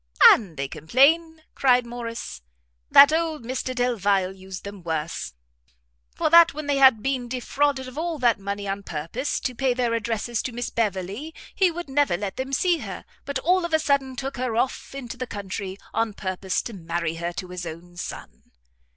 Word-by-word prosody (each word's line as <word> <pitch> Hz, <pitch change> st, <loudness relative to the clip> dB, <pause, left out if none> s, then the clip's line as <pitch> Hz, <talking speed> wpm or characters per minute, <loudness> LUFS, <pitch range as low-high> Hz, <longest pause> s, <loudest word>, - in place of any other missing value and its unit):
"And 185 Hz, -9 st, +1 dB
they 140 Hz, 0 st, -2 dB
complain," 300 Hz, -, +2 dB
cried 250 Hz, -2 st, +3 dB
Morrice, 230 Hz, -, -6 dB, 0.5 s
"that 285 Hz, +2 st, +8 dB
old 320 Hz, -4 st, -1 dB
Mr 255 Hz, +1 st, -3 dB
Delvile 205 Hz, -6 st, +1 dB
used 190 Hz, -1 st, -9 dB
them 200 Hz, -1 st, -8 dB
worse; 160 Hz, -, -3 dB, 0.8 s
for -, -, 0 dB
that 335 Hz, -3 st, +8 dB
when 305 Hz, 0 st, -5 dB
they 285 Hz, -1 st, +1 dB
had 260 Hz, -6 st, +6 dB
been 265 Hz, -2 st, -1 dB
defrauded 265 Hz, +2 st, -1 dB
of 255 Hz, +4 st, -7 dB
all 335 Hz, -1 st, -2 dB
that 240 Hz, -6 st, +2 dB
money 200 Hz, +1 st, -4 dB
on 195 Hz, +1 st, -2 dB
purpose 175 Hz, -, -3 dB
to 255 Hz, -, -2 dB
pay 255 Hz, 0 st, 0 dB
their 245 Hz, -2 st, 0 dB
addresses 230 Hz, 0 st, -1 dB
to 255 Hz, -, -4 dB
Miss 240 Hz, +1 st, -4 dB
Beverley, 210 Hz, -, -2 dB, 0.2 s
he 380 Hz, -3 st, +3 dB
would 345 Hz, 0 st, -6 dB
never 275 Hz, -9 st, +2 dB
let 200 Hz, +2 st, -5 dB
them 260 Hz, +1 st, -3 dB
see 340 Hz, +5 st, +2 dB
her, -, -, -7 dB, 0.2 s
but 280 Hz, -1 st, -2 dB
all 360 Hz, +6 st, +2 dB
of 340 Hz, -2 st, +1 dB
a -, -, +3 dB
sudden 280 Hz, -3 st, +1 dB
took 270 Hz, +1 st, -5 dB
her 250 Hz, -2 st, -2 dB
off 260 Hz, +3 st, -1 dB
into 255 Hz, -2 st, -6 dB
the 255 Hz, 0 st, -4 dB
country, 195 Hz, -2 st, -5 dB, 0.2 s
on 225 Hz, -1 st, 0 dB
purpose 190 Hz, -1 st, -2 dB
to 235 Hz, -, -7 dB
marry 170 Hz, -2 st, -3 dB
her 170 Hz, +1 st, -3 dB
to 185 Hz, +1 st, -6 dB
his 180 Hz, -1 st, -6 dB
own 170 Hz, +2 st, -9 dB
son." 180 Hz, -, -8 dB
240 Hz, 185 wpm, -24 LUFS, 190-275 Hz, 0.8 s, that